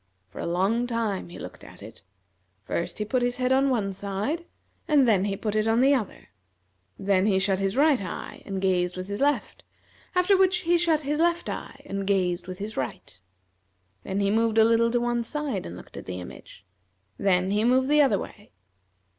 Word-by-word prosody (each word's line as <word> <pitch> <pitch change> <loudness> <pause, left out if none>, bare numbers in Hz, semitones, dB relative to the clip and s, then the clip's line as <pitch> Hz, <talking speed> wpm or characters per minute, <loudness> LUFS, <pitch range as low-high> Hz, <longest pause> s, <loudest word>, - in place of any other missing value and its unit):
For - - -11
a - - -3
long 195 +8 +1
time 225 -7 -2
he 175 - -10
looked - - -10
at - - -13
it. - - -12 0.6
First 170 - -3
he 210 - -2
put 250 +4 0
his 245 0 0
head 255 0 0
on 270 +1 +4
one 210 -6 0
side, 205 - -3 0.4
and 285 -4 +4
then 200 -4 +3
he 200 -1 -2
put 210 0 -3
it 215 0 +1
on 225 +1 +3
the 270 +3 +5
other; 240 -8 -3 0.7
then 195 0 +2
he 195 -3 +3
shut 190 0 +1
his 195 +3 -1
right 290 -4 +4
eye 185 - -7
and 195 -1 -4
gazed 180 -1 0
with 185 0 -5
his 205 +3 -4
left, 290 +1 0 0.5
after 360 +2 +4
which 375 -1 +3
he 345 -1 +2
shut 325 -3 +2
his 295 +1 -2
left 340 +1 +1
eye - - -7
and 195 0 -4
gazed 180 -3 0
with 185 -1 -6
his 210 +3 -6
right. 120 -7 -5 0.8
Then 195 +1 -2
he 200 0 +2
moved 225 0 +1
a 220 - +7
little 230 0 +3
to 240 +1 +1
one 240 0 0
side 265 -4 -3
and 85 - -8
looked - - -13
at - - -9
the 90 0 -4
image, 90 +1 -12 0.5
then 185 -1 +2
he 210 +1 +1
moved 255 +2 +3
the 300 +1 +5
other 265 -8 +3
way. 205 +2 -10
215 Hz, 205 wpm, -26 LUFS, 190-260 Hz, 0.8 s, a